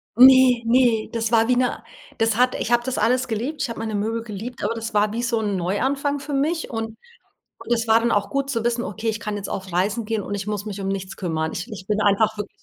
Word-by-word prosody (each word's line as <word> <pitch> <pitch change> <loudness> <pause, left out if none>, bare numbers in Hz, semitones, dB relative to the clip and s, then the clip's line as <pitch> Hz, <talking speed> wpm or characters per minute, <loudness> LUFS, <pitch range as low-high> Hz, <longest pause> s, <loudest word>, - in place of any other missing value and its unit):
Ne, 255 -1 +7
ne, 235 -2 +3
das 230 0 -1
war 225 0 +4
wie 250 - +3
ne 250 0 0 0.3
das 225 -1 +1
hat 250 0 +3
ich 240 - -3
habe 240 0 +3
das 260 0 -3
alles 250 +3 +2
geliebt. 250 +6 -3
Ich 260 - -1
habe 230 - -6
meine 220 -1 -3
Möbel 225 +3 -2
geliebt, 225 +3 -7
aber 210 +3 0
das 225 0 -5
war 210 0 +3
wie 235 - -2
so 235 -1 0
'n 205 -3 -1
Neuanfang 270 +11 -1
für 285 +1 -6
mich. 310 +4 0
Und 225 -1 -4 0.7
das 230 -1 +1
war 225 +1 +5
dann 235 0 0
auch 205 - +1
gut 275 0 -1
zu 230 -4 -1
wissen: 240 0 0
„Okay, 220 +2 -3
ich 220 0 -2
kann 210 -2 -4
jetzt 200 - -6
auf 190 -1 -5
Reisen 205 +6 0
gehen 220 -2 -2
und 205 - -5
ich 205 0 -4
muss 210 -1 -3
mich 205 -2 -5
nichts 195 -1 -3
kümmern.“ 160 -3 -2
Ich 180 - -5
ich 190 -3 -8
bin 210 0 0
einfach 215 +1 +3
wirklich 210 -1 -4
225 Hz, 250 wpm, -23 LUFS, 205-245 Hz, 0.7 s, Ne